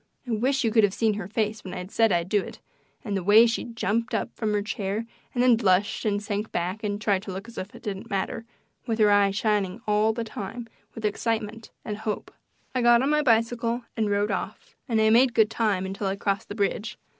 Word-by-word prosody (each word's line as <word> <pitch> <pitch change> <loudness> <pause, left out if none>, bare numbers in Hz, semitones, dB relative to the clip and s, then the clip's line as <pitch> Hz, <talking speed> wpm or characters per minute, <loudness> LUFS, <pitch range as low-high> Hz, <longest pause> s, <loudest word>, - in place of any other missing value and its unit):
I - - -3
wish 255 +5 +1
you 225 - +1
could 220 0 +4
have 205 -1 +2
seen 220 -2 +2
her 200 -3 -5
face 215 0 -2
when 185 -1 -7
I 180 - -5
said 225 +3 +2
I'd 170 -1 +1
do 205 +1 +2
it, - - -9 0.5
and 205 -3 -2
the 195 - -1
way 210 +5 +7
she 230 - -1
jumped 230 -1 -1
up - - -2
from 220 -2 -1
the 205 -1 0
chair 205 +1 -3 0.3
and 245 - +1
then 250 -2 +6
blushed 205 -1 +1
and 205 -1 +1
sank 210 0 -3
back 185 +5 -2
and 205 -1 -2
tried 200 -3 +1
to 200 - -7
look 195 +4 -6
as 235 - -12
if 185 - -7
it - - -13
didn't 200 -4 -5
matter 200 +2 -2 0.4
with 225 -2 0
her 210 -2 +5
eyes 200 -1 +4
shining 205 -2 0
all 210 +1 +3
the 230 +1 -3
time 225 +2 -6 0.3
with 225 - -5
excitement 220 +1 -2 0.2
and 210 -1 -4
hope. 215 -1 -4 0.4
I 255 - 0
got 240 +1 +5
on 280 - +1
my 300 0 +3
bicycle 235 -1 +1
and 220 -2 0
rode 205 +1 +1
off, - - -5
and 225 -2 +2
I 220 0 +4
made 240 +1 +5
good 220 -1 +4
time 205 -5 0
until 195 +1 -3
I 190 - -1
crossed 200 +1 -2
the 205 - -5
bridge. 205 +1 -1
215 Hz, 235 wpm, -26 LUFS, 200-230 Hz, 0.5 s, way